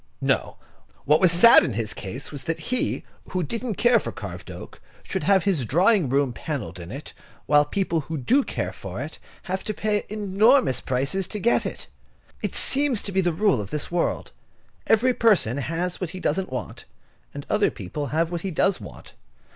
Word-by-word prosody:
No, -, -, 0 dB, 0.5 s
what 150 Hz, +2 st, +4 dB
was 185 Hz, -3 st, +6 dB
sad 180 Hz, +8 st, +8 dB
in 125 Hz, -, -2 dB
his 110 Hz, 0 st, -2 dB
case 110 Hz, +8 st, -6 dB
was 140 Hz, -3 st, -7 dB
that 165 Hz, -, -2 dB
he, 255 Hz, -, -1 dB, 0.3 s
who 185 Hz, -1 st, -1 dB
didn't 230 Hz, -, -3 dB
care 240 Hz, +2 st, +4 dB
for -, -, -5 dB
carved 95 Hz, -7 st, -8 dB
oak, -, -, -10 dB, 0.2 s
should -, -, -3 dB
have 195 Hz, 0 st, +4 dB
his 185 Hz, -10 st, +1 dB
drawing 175 Hz, -, +3 dB
room 135 Hz, -1 st, +1 dB
panelled 130 Hz, -, -5 dB
with 85 Hz, 0 st, -8 dB
it, 140 Hz, +3 st, -8 dB, 0.3 s
while 145 Hz, 0 st, +4 dB
people 170 Hz, +1 st, -1 dB
who 160 Hz, +2 st, -5 dB
do 250 Hz, -, +3 dB
care -, -, -4 dB
for -, -, -7 dB
it -, -, -7 dB, 0.2 s
have 190 Hz, +1 st, -3 dB
to 215 Hz, -, -3 dB
pay 210 Hz, 0 st, 0 dB
enormous 215 Hz, -, +3 dB
prices 140 Hz, +9 st, -1 dB
to 210 Hz, -, -5 dB
get 230 Hz, +4 st, +2 dB
it. -, -, -7 dB, 0.6 s
It -, -, -3 dB
seems 270 Hz, -5 st, +2 dB
to 200 Hz, -, -5 dB
be 190 Hz, 0 st, +2 dB
the 175 Hz, -1 st, +1 dB
rule 170 Hz, -, +2 dB
of 100 Hz, -, -7 dB
this 150 Hz, +2 st, -4 dB
world. 175 Hz, -1 st, -1 dB, 0.6 s
Each 245 Hz, +3 st, +3 dB
person 185 Hz, -, +3 dB
has 170 Hz, +6 st, -3 dB
what 180 Hz, -, -2 dB
he 185 Hz, +2 st, -8 dB
doesn't 185 Hz, -3 st, -1 dB
want, 130 Hz, -, -6 dB, 0.5 s
and 145 Hz, 0 st, -8 dB
other 210 Hz, 0 st, +2 dB
people 125 Hz, +8 st, -5 dB
have 160 Hz, +5 st, 0 dB
what 170 Hz, -1 st, -3 dB
he 195 Hz, -, -3 dB
does 190 Hz, +3 st, +1 dB
want. -, -, -12 dB
175 Hz, 195 wpm, -24 LUFS, 140-205 Hz, 0.6 s, sad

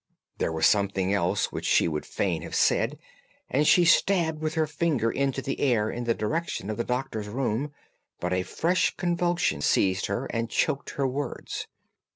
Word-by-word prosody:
There -, -, 0 dB
was 80 Hz, 0 st, +1 dB
something 100 Hz, -1 st, +2 dB
else 90 Hz, -3 st, +1 dB
which -, -, -5 dB
she -, -, +4 dB
would 75 Hz, -2 st, -3 dB
fain -, -, -1 dB
have -, -, -6 dB
said, -, -, +2 dB, 0.5 s
and 145 Hz, +3 st, +2 dB
she 175 Hz, -, +6 dB
stabbed 165 Hz, -3 st, +3 dB
with 155 Hz, 0 st, -2 dB
her 160 Hz, -1 st, +2 dB
finger 150 Hz, -7 st, 0 dB
into 135 Hz, -1 st, -1 dB
the -, -, -3 dB
air 115 Hz, -6 st, +2 dB
in 120 Hz, 0 st, -4 dB
the 115 Hz, -1 st, +1 dB
direction 110 Hz, -, -2 dB
of 110 Hz, -, -4 dB
the 120 Hz, -, 0 dB
Doctor's 125 Hz, -4 st, -3 dB
room, 130 Hz, +4 st, -2 dB, 0.5 s
but 90 Hz, +1 st, -1 dB
a 90 Hz, -, +1 dB
fresh 170 Hz, -, 0 dB
convulsion 175 Hz, -, 0 dB
seized 95 Hz, +5 st, +2 dB
her 100 Hz, +7 st, -2 dB
and 115 Hz, 0 st, -2 dB
choked 140 Hz, -, 0 dB
her 140 Hz, -1 st, +1 dB
words. 140 Hz, +3 st, -4 dB
125 Hz, 180 wpm, -27 LUFS, 100-155 Hz, 0.5 s, she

